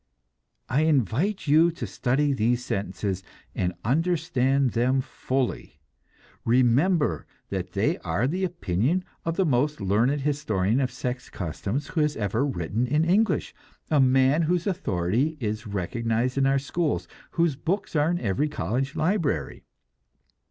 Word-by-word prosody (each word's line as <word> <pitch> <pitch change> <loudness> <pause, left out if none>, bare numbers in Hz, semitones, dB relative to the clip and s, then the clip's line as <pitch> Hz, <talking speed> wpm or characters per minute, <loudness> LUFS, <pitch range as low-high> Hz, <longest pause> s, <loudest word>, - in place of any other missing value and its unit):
I 135 - +1
invite 155 - +1
you 160 +3 +5
to - - -5
study 140 +3 0
these 120 0 +1
sentences 95 0 -2 0.3
and 90 -1 -1
understand 140 -3 +1
them 125 +4 +2
fully. 130 - -3 0.6
Remember 130 +8 +2 0.2
that - - -4
they - - +1
are 90 +9 -1
the 180 +8 -1
opinion 170 - 0 0.2
of 165 0 -1
the 190 - +2
most 145 +1 +1
learned 115 +9 +1
historian 120 -7 0
of 130 -2 +1
sex 125 0 -5
customs 100 - -4
who 165 - 0
has 150 0 0
ever 105 +4 0
written 115 - -1
in 150 +5 +2
English; 205 +6 +2 0.4
a 150 - +4
man 135 +3 +4
whose 170 +1 +1
authority 135 - 0
is 110 -2 -3
recognized 115 +5 -1
in 135 0 +2
our 135 0 +3
schools, 150 +3 -1 0.3
whose 170 -4 +2
books 180 +7 -2
are 150 +1 +3
in 175 0 0
every 125 +7 0
college 135 0 -2
library. 155 - 0
135 Hz, 140 wpm, -26 LUFS, 115-155 Hz, 0.6 s, you